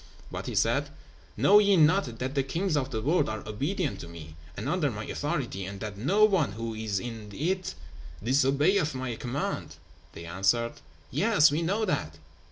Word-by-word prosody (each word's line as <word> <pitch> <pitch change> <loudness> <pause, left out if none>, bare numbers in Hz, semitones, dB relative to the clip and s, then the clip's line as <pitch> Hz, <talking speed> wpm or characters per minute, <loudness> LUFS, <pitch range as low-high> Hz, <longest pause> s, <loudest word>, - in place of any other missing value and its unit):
But - - -5
he - - -4
said, - - +2 0.5
"Know 205 +2 +7
ye 200 -2 +4
not 155 -6 +3
that 130 +3 -3
the 140 - +2
kings 165 +6 -1
of 135 -2 0
the 110 -4 -3
world 150 -1 +2
are 110 -1 -5
obedient 145 - -2
to - - -8
me, 80 -2 -10 0.2
and - - -4
under - - +1
my - - -5
authority, 95 - -3
and 100 +1 -7
that 105 -1 -5
no 185 - +4
one 175 - +2
who 115 +1 -4
is 110 -3 -2
in 110 -2 -7
it 185 - -1 0.5
disobeyeth 140 - +2
my 130 -2 -3
command?" 125 +5 -3 0.4
They 85 - -9
answered, 95 +7 +1 0.4
"Yes, 195 -9 +4
we 150 +3 0
know 200 +6 0
that." 80 - -2
135 Hz, 175 wpm, -28 LUFS, 110-175 Hz, 0.5 s, Know